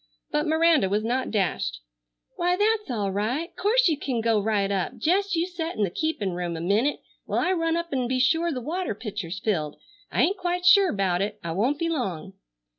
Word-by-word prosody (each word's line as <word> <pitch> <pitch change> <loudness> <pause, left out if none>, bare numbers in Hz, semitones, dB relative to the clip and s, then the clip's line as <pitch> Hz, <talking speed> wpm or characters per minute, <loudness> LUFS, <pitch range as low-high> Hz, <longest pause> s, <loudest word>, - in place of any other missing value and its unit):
But 300 +2 0
Miranda 320 - +3
was 210 +2 0
not 250 +3 -1
dashed. 175 - -1 0.6
"Why, 355 +1 +1
that's 425 -1 +1
all 205 -5 -1
right. 240 - -2
'Course 465 +4 +3
you 310 -4 +1
ken 260 -5 -2
go 225 -1 +2
right 200 -2 0
up. 200 +6 -2
Jest 375 - +1
you 335 +1 +1
set 345 -2 -5
in 215 - 0
the 190 - 0
keepin' 265 - -1
room 175 -1 -3
a - - -5
minnit 210 - +1 0.2
while - - -2
I 365 - +1
run 330 -2 +1
up'n 280 -8 -2
be 255 +1 0
sure 325 +6 +2
the 255 -4 -3
water 330 - -3
pitcher's 200 -5 -5
filled. 165 -9 -2 0.3
I - - +2
ain't 385 +5 +1
quite 360 -1 -2
sure 390 +1 +7
'bout 190 -3 0
it. 210 +1 -3
I 170 - -3
won't 235 - +1
be 335 - -1
long." 195 - -3
255 Hz, 205 wpm, -25 LUFS, 200-335 Hz, 0.6 s, sure